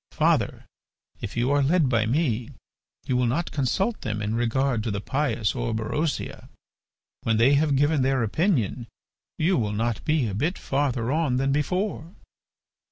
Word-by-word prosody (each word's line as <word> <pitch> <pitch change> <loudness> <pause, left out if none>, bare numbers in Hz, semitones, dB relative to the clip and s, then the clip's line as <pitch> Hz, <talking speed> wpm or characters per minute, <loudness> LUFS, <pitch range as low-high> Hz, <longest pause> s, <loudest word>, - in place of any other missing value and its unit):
Father, - - +1 0.5
if - - -6
you 120 +3 +1
are 145 0 +3
led 155 +2 +3
by 115 -4 +1
me 125 -4 0 0.6
you 130 - 0
will 125 -1 +2
not 155 +9 -1
consult 190 - 0
them 110 -3 -3
in 105 +1 -2
regard 120 +1 +1
to 110 - -3
the 100 -1 -2
pious 115 -3 -1
Orberosia. 110 - -2 0.7
When 115 -1 +1
they 120 +5 +5
have 145 0 +3
given 145 +1 +2
their 130 -1 +2
opinion 125 - 0 0.5
you 170 0 +2
will 105 -3 -1
not 115 +1 -1
be 155 -4 +1
a 100 - -4
bit 155 - -1
farther 130 -4 -1
on 150 -5 +1
than 135 +1 +1
before. 175 +4 -2
130 Hz, 160 wpm, -25 LUFS, 115-150 Hz, 0.7 s, they